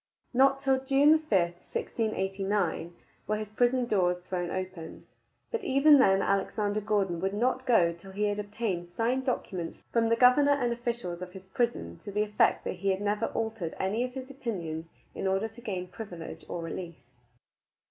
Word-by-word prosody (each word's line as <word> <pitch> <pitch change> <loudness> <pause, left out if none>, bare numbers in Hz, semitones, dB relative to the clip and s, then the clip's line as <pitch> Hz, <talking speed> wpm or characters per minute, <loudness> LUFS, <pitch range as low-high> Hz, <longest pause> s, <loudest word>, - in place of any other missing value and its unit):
Not 270 +2 +5
till 270 -1 +2
June 285 +3 +5
5, 310 - -19
1689, 190 0 -1 0.3
were 215 - +1
his 215 -1 -6
prison 245 +2 +2
doors 180 -6 +2
thrown 180 -1 -4
open, 185 -3 -6 0.5
but 465 - -2
even 280 +2 +6
then 195 -6 +5
Alexander 205 +1 0
Gordon 195 -5 0
would 190 +3 -1
not 255 +4 0
go 175 -9 +4
till 170 +3 -13
he 205 +2 -2
had 205 0 0
obtained 205 -4 -3
signed 240 +7 0
documents 185 -9 -2
from 230 -1 +2
the 230 - +4
governor 255 +4 +6
and 245 -4 +1
officials 235 -7 -4
of 180 0 -7
his 190 0 -10
prison 190 - -2
to - - -8
the 210 +1 +1
effect 210 0 +2
that - - -4
he 195 +2 -1
had 190 0 +1
never 210 +2 0
altered 220 -7 -3
any 210 +5 0
of 250 +1 -5
his 265 0 -6
opinions 170 - -4 0.3
in - - -3
order 195 +3 +1
to 225 +2 -14
gain 185 -6 -4
privilege 180 -3 -8
or 170 - -4
release. 165 -6 -7
205 Hz, 175 wpm, -29 LUFS, 180-240 Hz, 0.5 s, even